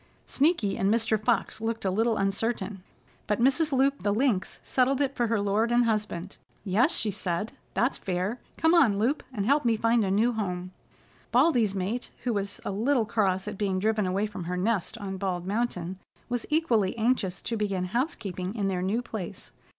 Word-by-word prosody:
Sneaky 275 - +1
and 195 +1 +2
Mr. 220 -1 +1
Fox 220 -1 0
looked 225 -1 -2
a 190 - +2
little 225 +3 +1
uncertain, 195 0 -1 0.5
but 210 +1 0
Mrs. 275 +6 +3
Loup 275 +1 +2
the 205 - +1
Lynx 220 -3 0
settled 260 +1 +2
it 275 -1 +1
for 240 -3 0
her 225 -1 +1
lord 205 +3 +1
and 240 0 +4
husband. 210 -5 -2 0.3
"Yes," 220 - +3
she 215 - +2
said, 190 +1 -3 0.2
"that's 240 +8 +1
fair. 185 +6 -2 0.2
Come 320 +1 +3
on, 260 -13 +5
Loup, 245 +8 +1
and 205 -6 -2
help 285 +5 +3
me 230 -2 +2
find 230 +1 +3
a 195 - 0
new 215 +5 +3
home." 180 -4 -3 0.6
Baldy's 240 -6 +3
mate, 200 +6 -2
who 245 - 0
was 200 -1 -3
a - - -1
little 230 +4 +1
cross 195 -3 0
at 210 -2 -5
being 195 -3 0
driven 210 0 +1
away 195 +3 0
from 205 -5 -6
her 180 +1 -2
nest 210 +2 0
on 195 -3 -5
Bald 185 -2 -2
Mountain, 190 -4 -2 0.3
was 245 -1 -2
equally 240 - +2
anxious 220 -5 +1
to 230 - -2
begin 200 -4 -1
housekeeping 195 - -3
in 200 -3 0
their 185 -2 -1
new 210 +6 0
place. 215 -6 -6
215 Hz, 190 wpm, -27 LUFS, 195-240 Hz, 0.6 s, on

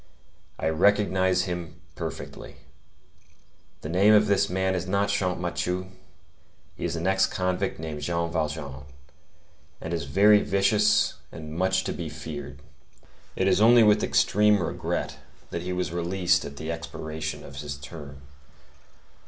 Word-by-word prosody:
I - - -2
recognize 95 +1 +2
him 90 -3 -5
perfectly. 70 - -7 1.3
The 75 - -6
name 100 +5 +5
of 105 0 +5
this 100 -2 +2
man 95 +1 0
is 95 0 -3
not 100 +2 +1
Champmathieu; 90 -1 -2 0.8
he - - -5
is 85 -1 -2
an 85 +1 -3
ex 95 0 +3
convict 90 0 -2
named 80 -2 -6
Jean 85 0 -1
Valjean, 75 -4 -3 0.9
and 80 - -5
is 85 -1 -2
very 105 +2 +5
vicious 105 +2 +2
and 80 -1 -8
much 95 +2 +1
to - - -3
be 85 -3 -5
feared. 75 -3 -8 0.7
It 95 - +1
is 95 +1 +3
only 115 +1 +7
with 105 0 +4
extreme 105 -1 +3
regret 70 - -3 0.3
that 85 - -3
he 90 +1 -4
was 90 -1 -2
released 90 +1 +1
at 70 0 -8
the 80 +2 -4
expiration 80 -2 -5
of 70 -1 -11
his 70 0 -5
term. 70 -2 -10
90 Hz, 140 wpm, -26 LUFS, 80-95 Hz, 1.3 s, only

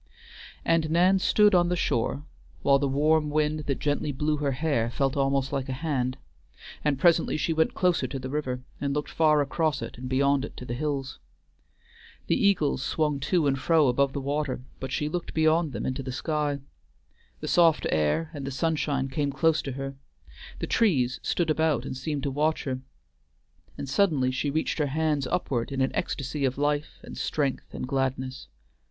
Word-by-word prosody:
And 165 -2 +2
Nan 180 +4 +4
stood 210 +2 +4
on 175 -1 +4
the 180 - +1
shore 140 -1 -1 0.4
while 140 0 +5
the 140 - +1
warm 150 +3 +2
wind 155 +1 +1
that 140 - 0
gently 145 0 -1
blew 150 +3 0
her 140 -2 0
hair 140 -5 0
felt 135 +2 0
almost 135 -1 +1
like 135 -1 -2
a - - -1
hand, 130 -3 -1 0.7
and 150 -2 +1
presently 170 +3 +3
she 165 +2 0
went 160 0 +1
closer 180 -7 +2
to 135 - -5
the 130 0 -6
river, 130 -4 -2 0.2
and 140 0 -1
looked 150 - -3
far 155 -2 +4
across 155 0 0
it - - -7
and 130 0 -6
beyond 140 +1 +2
it - - -7
to 125 - -7
the 120 - -4
hills. 140 0 -3 1.1
The - - +2
eagles 150 -9 +2
swung 150 0 0
to 165 +3 +1
and 135 -1 +1
fro 155 -2 +4
above 135 +2 +2
the 140 - -2
water, 140 -2 -2 0.2
but 130 0 -5
she 150 - -1
looked 175 +2 -4
beyond 160 0 +3
them 115 -4 -4
into 130 +1 -2
the 130 -1 -5
sky. 145 0 -1 0.8
The - - -5
soft 165 -3 +4
air 80 - +1
and 145 -2 -6
the - - -1
sunshine 140 -1 0
came 140 +1 -1
close 160 +3 +2
to 135 - -5
her; 135 +1 -5 0.6
the - - -3
trees 135 - +2
stood 170 -3 0
about 160 -1 +1
and - - -4
seemed 140 +1 -3
to 140 - -1
watch 155 +3 0
her; 130 -2 -3 1.0
and 140 - -5
suddenly 135 -4 +2
she 135 +3 -1
reached 155 +3 -1
her 150 - +2
hands 150 -1 0
upward 125 -6 -1
in 135 - -3
an 130 - +2
ecstasy 140 +1 -2
of 130 -1 0
life 145 +1 -1
and - - -9
strength 140 -4 -2
and - - -4
gladness. 130 0 -2
145 Hz, 190 wpm, -27 LUFS, 135-155 Hz, 1.1 s, while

